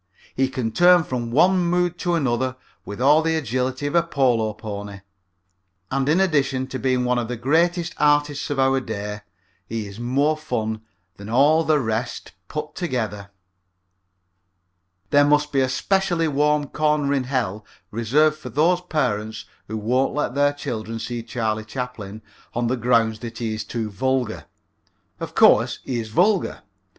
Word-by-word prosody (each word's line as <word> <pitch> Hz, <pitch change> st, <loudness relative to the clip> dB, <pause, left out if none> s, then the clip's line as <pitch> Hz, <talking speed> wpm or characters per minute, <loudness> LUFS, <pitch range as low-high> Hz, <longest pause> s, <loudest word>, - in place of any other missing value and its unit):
He 135 Hz, 0 st, +1 dB
can 125 Hz, -4 st, -3 dB
turn 175 Hz, +4 st, +5 dB
from 120 Hz, -5 st, -3 dB
one 180 Hz, +9 st, +4 dB
mood 175 Hz, 0 st, 0 dB
to 175 Hz, -1 st, 0 dB
another 130 Hz, -3 st, 0 dB, 0.3 s
with 105 Hz, -, -7 dB
all 145 Hz, +5 st, +5 dB
the 160 Hz, 0 st, 0 dB
agility 130 Hz, -1 st, -2 dB
of 145 Hz, -, -2 dB
a 170 Hz, -, +5 dB
polo 125 Hz, -9 st, +1 dB
pony. 100 Hz, -2 st, -7 dB, 0.9 s
And 135 Hz, +1 st, 0 dB
in 165 Hz, +5 st, +3 dB
addition 140 Hz, -8 st, +1 dB
to 130 Hz, -, -4 dB
being 130 Hz, -1 st, +1 dB
one 125 Hz, 0 st, +1 dB
of 120 Hz, -, -3 dB
the 120 Hz, 0 st, -4 dB
greatest 165 Hz, +7 st, +1 dB
artists 145 Hz, -1 st, +2 dB
of 145 Hz, -, -2 dB
our 135 Hz, 0 st, +3 dB
day 105 Hz, -4 st, -5 dB, 0.5 s
he 115 Hz, -1 st, -4 dB
is 100 Hz, +2 st, -10 dB
more 140 Hz, +6 st, +1 dB
fun 110 Hz, -8 st, -3 dB, 0.4 s
than 100 Hz, +1 st, -9 dB
all 145 Hz, +7 st, +4 dB
the 155 Hz, -1 st, +3 dB
rest 115 Hz, -1 st, -3 dB, 0.2 s
put 150 Hz, -1 st, -5 dB
together. 110 Hz, -, -3 dB, 1.8 s
There 145 Hz, 0 st, +6 dB
must 145 Hz, 0 st, +2 dB
be 135 Hz, -, +1 dB
a 130 Hz, -, +1 dB
specially 175 Hz, +4 st, +1 dB
warm 150 Hz, 0 st, +2 dB
corner 150 Hz, -2 st, +1 dB
in 135 Hz, -2 st, 0 dB
Hell 115 Hz, -6 st, -2 dB, 0.3 s
reserved 145 Hz, +8 st, +2 dB
for -, -, -8 dB
those 170 Hz, +5 st, +2 dB
parents 110 Hz, -11 st, -2 dB, 0.2 s
who 110 Hz, -, -4 dB
won't 125 Hz, +6 st, 0 dB
let 150 Hz, -4 st, -1 dB
their 145 Hz, +1 st, +2 dB
children 115 Hz, -5 st, -5 dB
see 120 Hz, +1 st, -4 dB
Charlie 110 Hz, -2 st, -2 dB
Chaplin 110 Hz, -3 st, -6 dB, 0.3 s
on 120 Hz, 0 st, 0 dB
the 120 Hz, +2 st, +1 dB
ground 115 Hz, -2 st, +2 dB
that 115 Hz, 0 st, -8 dB
he 115 Hz, -2 st, -2 dB
is 110 Hz, -, -4 dB
too 110 Hz, -3 st, -4 dB
vulgar. 130 Hz, +1 st, -1 dB, 0.7 s
Of -, -, -6 dB
course, -, -, +5 dB
he 125 Hz, -3 st, -2 dB
is 110 Hz, -1 st, -5 dB
vulgar. 185 Hz, -, +1 dB
130 Hz, 160 wpm, -22 LUFS, 115-150 Hz, 1.8 s, There